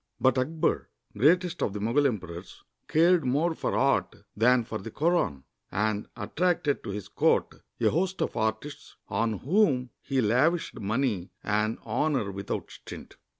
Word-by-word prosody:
But 130 -1 +4
Akbar, 155 +5 0 0.3
greatest 170 - +3
of 95 - 0
the 105 - -4
Mogul 120 +7 +2
emperors, 90 -7 -6 0.2
cared 170 +1 +4
more 145 +7 +1
for - - -2
art - - +2 0.2
than 120 +3 +4
for 110 -1 -5
the 115 - -7
Koran, 150 - 0 0.3
and 105 +2 -1
attracted 175 -5 0
to 115 - -6
his 100 0 -5
court - - +1 0.2
a - - +3
host 185 +4 0
of - - -4
artists 110 +7 -3
on 110 +3 0
whom 130 - +1
he 135 - -1
lavished 130 +10 +2
money 110 -3 -1
and 105 +2 0
honor 120 -2 0
without 100 +1 -5
stint. - - -11
125 Hz, 150 wpm, -28 LUFS, 105-155 Hz, 0.3 s, But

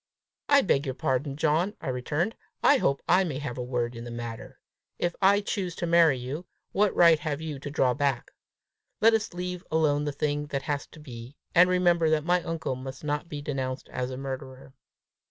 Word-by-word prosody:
"I 285 -1 +7
beg 140 -6 +1
your 130 - -3
pardon, 135 +2 -1
John!" 160 +7 +1
I 145 - -4
returned; 145 - -1 0.3
"I 285 - +6
hope 140 - 0
I 185 +2 +5
may 155 -7 -3
have 135 -3 -5
a - - -2
word 120 -1 -2
in 115 - -7
the 120 - -7
matter! 120 -1 -7 0.4
If 175 -1 -1
I 200 +1 +5
choose 190 -4 -3
to - - -3
marry 165 -4 +5
you, 135 +8 -6 0.2
what 205 0 +2
right 165 -3 +6
have 150 -1 -3
you 155 -3 -5
to 145 - -6
draw 130 -3 +2
back? 140 -3 -1 0.7
Let 225 +1 +6
us 220 -5 -1
leave 180 0 -4
alone 150 -2 +2
the 145 - -1
thing 145 +1 -2
that 140 -2 -3
has 145 0 -2
to 155 - -15
be, 125 -2 -10 0.2
and 180 +1 +6
remember 175 -3 +3
that 155 -1 +1
my 180 +1 +3
uncle 165 -6 -3
must 130 +2 -8
not 150 +2 -2
be 145 -1 -6
denounced 130 -2 -3
as 125 0 -3
a 130 - -6
murderer! 130 0 -7
145 Hz, 205 wpm, -27 LUFS, 130-175 Hz, 0.7 s, I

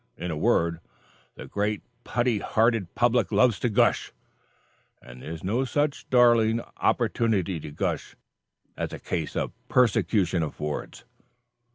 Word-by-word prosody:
In 90 0 -4
a - - -2
word, 85 +2 +1 0.6
the - - -9
great 105 0 -2 0.2
putty 120 -2 0
hearted 110 -4 +1
public 120 0 +2
loves 120 -5 +3
to 120 - 0
'gush,' 105 - +2 0.9
and 60 0 -13
there - - -8
is 80 -1 -7
no 110 +8 0
such 145 +3 -1
darling 120 -2 +4 0.2
opportunity 95 -7 +1
to 75 - -8
gush 75 - -3 0.6
as - - -4
a - - -6
case 80 -4 -4
of - - -1 0.2
persecution 105 -7 +2
affords." 75 -1 -5
105 Hz, 135 wpm, -26 LUFS, 85-120 Hz, 0.9 s, darling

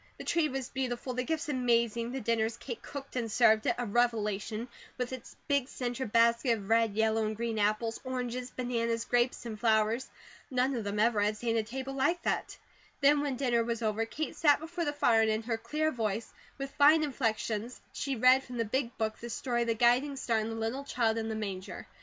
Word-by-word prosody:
The - - -7
tree 330 -3 +1
was 265 -1 -3
beautiful, 255 -1 -3
the 250 - -1
gifts 315 +2 -2
amazing, 235 -3 +1
the 265 - -3
dinner, 225 0 +1
as 225 +1 -4
Kate 235 -2 -7
cooked 280 -2 -8
and 230 -3 -2
served 220 -1 +4
it, - - +2
a 245 - -2
revelation, 220 -1 0 0.3
with 250 0 -3
its 255 -2 -9
big 280 -3 +1
centre 245 -1 -3
basket 235 +2 +3
of 200 -1 -9
red, 225 -2 +3
yellow, 220 0 +2
and 215 0 -2
green 230 -1 -2
apples, 215 +2 0
oranges, 250 -1 -3
bananas, 235 -2 -1
grapes, 245 0 +1
and 220 -2 -6
flowers. 220 +2 +2 0.4
None 255 +1 +1
of 230 -4 -3
them 200 +1 -2
ever 220 -1 +3
had 210 +1 +1
seen 230 0 -1
a 225 - +3
table 260 +5 -5
like 285 +6 +1
that. - - -1 0.4
Then 290 +1 +5
when 285 -3 -1
dinner 240 -3 +1
was 235 0 -3
over, 220 +1 0
Kate 310 +7 -4
sat 295 -2 +4
before 335 +2 -4
the 290 - 0
fire 230 -6 +3
and 220 - +3
in 220 +1 0
her 230 0 -1
clear 305 +7 -1
voice, 220 -3 -3 0.2
with 275 0 -5
fine 305 +3 +5
inflections, 230 -4 -2
she 275 -2 -2
read 255 +3 +5
from 250 -2 -8
the 230 - 0
Big 240 +2 -2
Book 220 -1 -2
the 235 - -7
story 240 +1 -1
of 235 - 0
the 230 - +1
guiding 245 +5 +3
star 235 -4 0
and 220 +1 -2
the 225 - -4
little 225 +5 -3
child 230 -4 0
in 225 0 -3
the 220 - -2
manger. 195 -3 -5
235 Hz, 220 wpm, -30 LUFS, 225-260 Hz, 0.4 s, Then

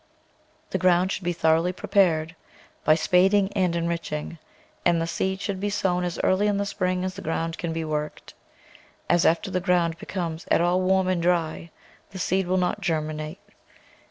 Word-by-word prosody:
The - - -1
ground 185 +1 +3
should - - -3
be 175 - +1
thoroughly 165 +1 +2
prepared 170 -4 +1 0.5
by 155 - +5
spading 190 +4 +3
and 180 -4 +1
enriching, 170 -1 -3 0.4
and 170 -1 +3
the 165 - 0
seed 190 +3 -2
should 200 -1 -3
be 205 +1 -1
sown 180 -3 0
as 175 -1 -3
early 195 +3 +3
in 205 -1 +1
the 200 - -1
spring 185 -2 -1
as 185 - -3
the - - -9
ground 165 +1 -3
can 170 - -3
be 160 0 -3
worked, 150 -1 -4 0.7
as 175 -1 +3
after 170 +4 +1
the 185 - 0
ground 170 -2 +1
becomes 175 -5 -5
at - - +4
all 175 +2 +2
warm 190 0 +2
or 185 - +2
dry, 170 -2 0 0.4
the 190 - -9
seed 190 0 0
will 185 +1 +1
not 180 +3 0
germinate. 155 -2 -2
175 Hz, 180 wpm, -25 LUFS, 165-190 Hz, 0.7 s, by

